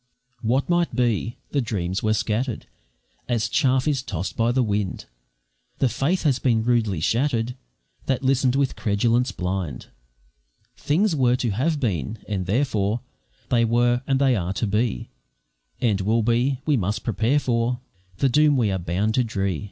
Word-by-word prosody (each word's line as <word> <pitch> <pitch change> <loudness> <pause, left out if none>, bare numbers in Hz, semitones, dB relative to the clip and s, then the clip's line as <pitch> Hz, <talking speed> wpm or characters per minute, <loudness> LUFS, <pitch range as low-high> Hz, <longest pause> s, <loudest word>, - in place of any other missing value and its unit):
What 125 +4 +1
might 175 -1 +1
be! 120 -2 0
the 140 - +1
dreams 95 -4 -2
were 110 0 +1
scatter'd, 110 +3 -2 0.6
As 115 -2 +1
chaff 130 +6 +2
is 140 -4 +1
toss'd 95 -8 -4
by 115 +1 +2
the 130 +1 +2
wind, 100 -4 -2 0.7
The 130 - +2
faith 140 - 0
has 140 -5 +2
been 115 -4 +2
rudely 110 -7 +1
shattered 120 - 0 0.5
That 135 -1 0
listen'd 130 -1 +2
with 140 -1 +1
credence 115 +3 +1
blind; 90 -3 -4 0.9
Things 170 +5 +1
were 125 -3 +3
to 125 -3 -1
have 145 +9 0
been, 105 - -2
and 95 -4 -3
therefore 110 -1 0 0.5
They 120 -1 +3
were, 120 +1 +2
and 135 - +2
they 135 -2 +3
are 95 -2 -2
to 105 - -1
be, 105 - -1 0.7
And 105 -5 +1
will 110 +4 +1
be; 125 +4 +1
we 150 -3 +2
must 105 +2 -2
prepare 115 +5 +1
for 120 -2 0 0.4
The 135 - +2
doom 150 +2 +4
we 110 -5 +2
are 95 - -1
bound 90 +6 -1
to 125 - +2
dree. 100 -6 -2
120 Hz, 160 wpm, -23 LUFS, 105-130 Hz, 0.9 s, doom